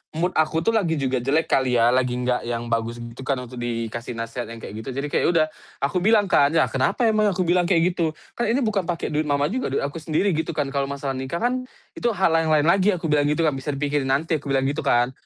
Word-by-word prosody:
mood 175 +3 0
aku 160 +1 +1
tuh 225 - +2
lagi 175 -7 +1
juga 130 -2 0
jelek 145 +6 +2
kali 130 -2 +2
ya, 115 +1 +4
lagi 125 -1 +1
gak 125 0 0
yang 120 0 -3
bagus 115 +1 -1
gitu 120 +3 -9
kan 135 - +2
untuk 125 0 -9
dikasih 115 0 -4
nasehat 115 +1 -4
yang 115 - -8
kayak 105 - -7
gitu. 110 - -7
Jadi 140 +1 -2
kayak - - +1
ya - - +3
udah 155 -1 +4 0.4
aku 180 +6 +1
bilang 210 +2 +4
kan, 145 +3 +4
"Ya 160 - +5
kenapa 135 - 0
emangnya?" 215 -4 +3
Aku 185 - +1
bilang 175 0 +2
kayak 180 -1 +3
gitu, 160 -2 -1 0.2
"kan 240 - -2
ini 240 +4 +1
bukan 200 -5 0
pake 170 -2 -2
duit 150 0 0
Mama 145 +3 +1
juga, 255 +1 -1
duit - - 0
aku 145 +4 -4
sendiri 160 +5 0
gitu 160 0 -2
kan 140 -2 -1
kalo 140 -1 -1
masalah 140 0 -3
nikah 130 - -4
kan 255 +1 0 0.3
itu - - 0
hal 185 -4 +2
yang 165 0 +2
lain 150 -2 +4
lagi," 190 +4 +3
aku 165 -2 -3
bilang 145 -1 +3
gitu 150 +3 +1
kan, 155 - +3
"bisa 135 +1 -4
dipikirin 145 -1 -1
nanti." 155 +4 +1
aku 140 - -11
bilang 135 -1 +1
gitu 140 +3 -1
kan. 120 +1 +2
150 Hz, 260 wpm, -23 LUFS, 130-170 Hz, 0.4 s, Ya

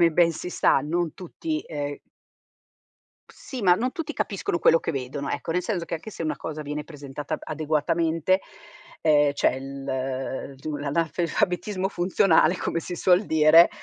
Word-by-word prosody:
come 170 -1 +6
ben 170 +1 +4
si 180 - -6
sa, 140 - +3
non 165 +2 -1
tutti, 310 - -4
ehm 145 -2 -5 1.3
Sì, 260 -3 -8
ma 180 -3 +5
non 250 +6 -1
tutti 310 -2 -5
capiscono 190 -3 -2
quello 165 - +5
che - - -2
vedono, 140 0 -4
ecco, - - -3
nel 180 +1 0
senso 185 -7 -2
che - - -13
anche 165 +7 -7
se 170 - -6
una 155 - -1
cosa 155 -1 -5
viene 150 +1 -4
presentata 145 0 -6
b - - -18
adeguatamente, 160 +4 +1 0.6
ehm, 150 -2 +4
cioè, 130 -1 +1
l 135 0 -4
tu 150 +2 -5
l'analfabetismo 170 +6 -1
funzionale, 180 -1 +3
come 165 - -2
si 175 +1 -6
suol 185 +4 +4
dire, 160 +2 +7
160 Hz, 160 wpm, -25 LUFS, 145-180 Hz, 1.3 s, dire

